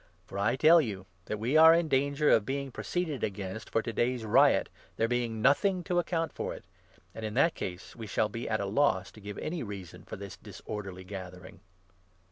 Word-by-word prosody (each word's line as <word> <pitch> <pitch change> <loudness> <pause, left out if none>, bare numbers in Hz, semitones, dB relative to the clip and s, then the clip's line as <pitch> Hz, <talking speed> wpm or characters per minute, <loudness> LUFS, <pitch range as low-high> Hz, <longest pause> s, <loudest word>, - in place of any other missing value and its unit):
For 100 - -6
I 110 +5 +2
tell 160 +5 +7
you 100 -8 -5 0.2
that 105 - -3
we 120 +7 -1
are 160 +1 +9
in 170 -1 +1
danger 140 +1 +2
of 110 - +5
being 135 +3 -3
pro - - -7
40 - - -9 0.2
ceeded 150 -5 -5
against 100 +1 -4
for 115 - 0
to 115 - -4
day's 120 -1 0
riot, 105 - +4 0.3
there 115 - +2
being 115 -2 -1
nothing 180 +7 +3
to 175 0 +1
account 165 -2 -1
for - - -4
it; - - -13 0.5
and 110 - -8
in 110 0 -4
that 155 +5 +4
case 90 0 -7
we 115 -2 -7
shall 105 +2 +1
be 115 +3 -5
at 110 -1 0
a 100 - -1
loss 100 -2 +1
to 110 - -15
give 105 0 -7
any 165 +1 -3
reason 100 -6 -8
for - - -8
this 100 -1 -9
disorderly 95 -4 -7
gathering." 90 -2 -9
115 Hz, 215 wpm, -30 LUFS, 100-140 Hz, 0.5 s, are